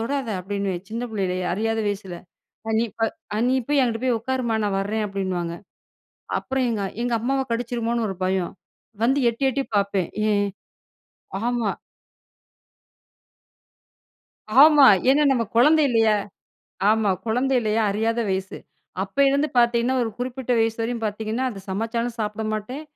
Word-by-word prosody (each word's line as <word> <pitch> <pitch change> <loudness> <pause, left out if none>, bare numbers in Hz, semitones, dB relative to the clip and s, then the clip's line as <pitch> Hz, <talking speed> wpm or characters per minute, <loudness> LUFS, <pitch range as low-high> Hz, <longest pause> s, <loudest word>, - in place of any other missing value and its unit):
தொடாத! 265 +2 -2
அப்படின்னுவேன், 195 -1 -3
சின்ன 225 +2 -4
பிள்ளைலயே. 185 -4 -2
அறியாத 225 +4 -1
வயசில! 195 -3 -4 0.5
அ - - 0
நீ 230 - +2
ப - - -5 0.5
நீ 255 - +2
போய் 290 -1 +3
அங்கிட்டு 235 -1 -1
போய் 255 -2 +2
உட்காரும்மா! 245 -1 -1
நான் 200 -2 0
வர்றேன்! 210 +2 -1
அப்டின்னுவாங்க. 185 -4 -3 0.8
அப்புறம் 265 -1 -1
எங்க 215 -3 -1 0.2
எங்க 240 0 -1
அம்மாவ 270 +3 0
கடிச்சிருமோன்னு 235 0 -1
ஒரு 190 - -4
பயம். 185 -1 -1 0.5
வந்து 265 +4 +3
எட்டி, 235 +4 -6
எட்டி 270 +2 -1
பார்ப்பேன். 200 -3 0 0.2
ஏன்? 205 0 +2 1.0
ஆமா. 235 -3 0 2.9
ஆமா. 295 -2 +8 0.2
ஏன்னா, 290 +3 +4
நம்ம 240 -3 +1
குழந்த 305 +6 +6
இல்லையா? 225 -3 +3 0.7
ஆமா. 220 -2 +2 0.2
குழந்த 250 +4 +1
இல்லையா? 220 0 +1
அறியாத 225 +3 0
வயசு. 190 0 -3 0.4
அப்போ 200 +8 -3
இருந்து 280 +2 +1
பாத்தீங்கன்னா, 235 +1 +3
ஒரு 225 - -2
குறிப்பிட்ட 250 0 -3
வயசுவரயும், 225 +1 -1
பாத்தீங்கன்னா, 220 +4 -2
அது 200 -4 -8
சமைச்சாலும், 230 +3 -2
சாப்பிட 210 +1 -3
மாட்டேன். 245 +8 -5
225 Hz, 135 wpm, -23 LUFS, 205-245 Hz, 2.9 s, ஆமா